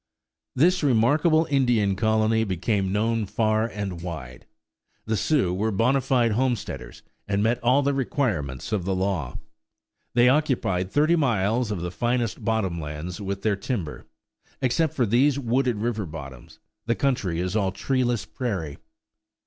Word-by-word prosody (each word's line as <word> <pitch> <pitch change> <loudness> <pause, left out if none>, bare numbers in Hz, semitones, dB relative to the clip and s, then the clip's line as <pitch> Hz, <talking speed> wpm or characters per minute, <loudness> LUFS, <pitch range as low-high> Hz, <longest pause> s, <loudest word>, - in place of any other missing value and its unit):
This 180 +7 +3
remarkable 150 +5 +3
Indian 120 -8 +2
colony 110 +2 +2
became 95 0 -1
known 110 +1 0
far 110 +2 +1
and 100 -6 -5
wide. 70 -8 -7 0.6
The 110 - 0
Sioux 105 - +1
were 105 +4 0
bona 115 +6 +2
fide 125 -3 +2
homesteaders 125 +1 -2 0.2
and 100 0 0
met 120 +2 0
all 130 +4 +4
the 140 +1 +1
requirements 110 - -2
of 105 -4 0
the 95 +1 -1
law. 90 -9 -2 0.8
They 120 0 +5
occupied 125 -10 +1
thirty 155 +8 +3
miles 120 - +1
of 100 -5 -3
the 90 0 -3
finest 120 +1 -1
bottom 105 -6 0
lands 75 +6 -6
with 100 0 -4
their 110 -2 +2
timber; 95 - -4 0.5
except 140 +4 +1
for 125 - +2
these 130 +6 +3
wooded 125 -1 +1
river 110 -2 -2
bottoms, 70 -5 -10 0.3
the 115 - +2
country 105 -12 0
is 90 +3 -2
all 100 -3 +1
treeless 120 +1 -1
prairie. 95 - -4
110 Hz, 145 wpm, -25 LUFS, 95-125 Hz, 0.8 s, They